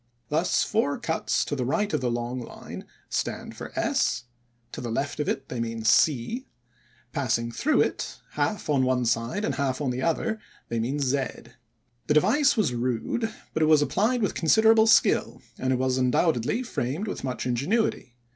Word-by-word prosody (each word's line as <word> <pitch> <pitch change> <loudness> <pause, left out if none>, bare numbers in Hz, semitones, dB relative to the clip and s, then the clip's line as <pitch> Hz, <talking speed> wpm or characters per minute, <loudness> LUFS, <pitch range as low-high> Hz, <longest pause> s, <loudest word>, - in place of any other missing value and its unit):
Thus 160 +4 +2
four 210 -10 0
cuts 160 - -1
to 145 - -2
the 130 - -1
right 185 +11 0
of - - +1
the 125 - 0
long 120 +1 -2
line - - -9 0.2
stand - - -3
for - - -8
S; - - +1 0.5
to - - -6
the 120 - -4
left 140 +7 -2
of 150 - 0
it 135 - -2
they 125 - -5
mean 115 -1 -3
C; 145 - +2 0.6
passing 120 -3 -1
through 305 - +2
it, - - -2
half 210 -4 -1
on 140 -3 +2
one 125 -1 +1
side 115 - 0
and - - -1
half 135 -3 -1
on 140 -4 -1
the 125 +1 -3
other, 220 - 0 0.3
they 115 - -1
mean 125 +6 -1
Z. 140 0 +1 0.9
The - - +3
device 255 - +4
was 205 - +2
rude, 125 - -1 0.2
but 160 - -1
it 155 - +4
was 155 -2 +5
applied 225 +9 +1
with 200 - 0
considerable 220 +6 +5
skill, 220 - +3 0.2
and 130 - 0
it - - +3
was 130 0 +1
undoubtedly 130 - +1
framed 165 - -3
with - - -5
much 130 -2 -3
ingenuity. 130 - 0
140 Hz, 180 wpm, -26 LUFS, 125-205 Hz, 0.9 s, was